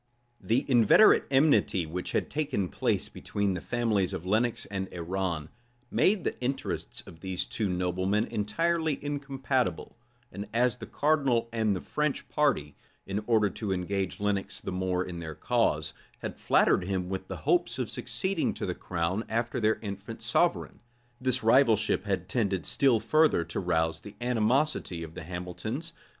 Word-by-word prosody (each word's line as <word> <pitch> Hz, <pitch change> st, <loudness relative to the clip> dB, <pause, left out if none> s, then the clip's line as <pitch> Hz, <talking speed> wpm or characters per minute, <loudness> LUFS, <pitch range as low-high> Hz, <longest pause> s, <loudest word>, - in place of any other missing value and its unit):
The 120 Hz, +5 st, +1 dB
inveterate 125 Hz, -, +6 dB
enmity 135 Hz, -, +3 dB
which 90 Hz, +3 st, -5 dB
had -, -, 0 dB
taken 140 Hz, -, -1 dB
place -, -, 0 dB
between 100 Hz, -1 st, -2 dB
the 90 Hz, -, -4 dB
families 110 Hz, -6 st, 0 dB
of 85 Hz, -, -5 dB
Lenox 110 Hz, +5 st, +1 dB
and 95 Hz, -1 st, -4 dB
Arran, 85 Hz, -3 st, -3 dB, 0.4 s
made 195 Hz, -2 st, +3 dB
the -, -, -3 dB
interests 130 Hz, +2 st, -3 dB
of 80 Hz, -, -13 dB
these 95 Hz, -1 st, -2 dB
two 105 Hz, -3 st, -2 dB
noblemen 95 Hz, +3 st, 0 dB
entirely 160 Hz, +9 st, 0 dB
incompatible; 135 Hz, -, -1 dB, 0.4 s
and 100 Hz, +2 st, -6 dB
as 125 Hz, +1 st, +2 dB
the -, -, -8 dB
cardinal 140 Hz, -6 st, +1 dB
and 110 Hz, -3 st, +1 dB
the 90 Hz, -, -4 dB
French 150 Hz, -1 st, -2 dB
party, 130 Hz, -, +1 dB, 0.3 s
in 100 Hz, +2 st, -3 dB
order 110 Hz, -3 st, +4 dB
to 105 Hz, +1 st, -4 dB
engage 95 Hz, +1 st, -2 dB
Lenox 100 Hz, -1 st, -1 dB
the -, -, -5 dB
more 90 Hz, 0 st, -1 dB
in 85 Hz, -2 st, -6 dB
their 80 Hz, -2 st, -6 dB
cause, 80 Hz, -11 st, +1 dB, 0.2 s
had -, -, -5 dB
flattered 90 Hz, -, +3 dB
him 95 Hz, -2 st, -1 dB
with 95 Hz, 0 st, -4 dB
the -, -, -5 dB
hopes -, -, +1 dB
of -, -, -1 dB
succeeding 190 Hz, -3 st, -2 dB
to -, -, -3 dB
the 90 Hz, -, -1 dB
crown 90 Hz, +4 st, -2 dB
after 115 Hz, +2 st, -1 dB
their 110 Hz, -1 st, +2 dB
infant 100 Hz, +2 st, -6 dB
sovereign, -, -, +1 dB, 0.4 s
this 130 Hz, -2 st, 0 dB
rivalship 115 Hz, -3 st, +4 dB
had 95 Hz, -3 st, -1 dB
tended 95 Hz, -4 st, 0 dB
still 130 Hz, -5 st, +3 dB
further 155 Hz, -, +3 dB
to -, -, -4 dB
rouse 80 Hz, 0 st, 0 dB
the 105 Hz, -, -11 dB
animosity 120 Hz, -, +1 dB
of 80 Hz, -1 st, -9 dB
the -, -, -7 dB
Hamiltons. 90 Hz, -, -5 dB
105 Hz, 160 wpm, -29 LUFS, 90-125 Hz, 0.4 s, inveterate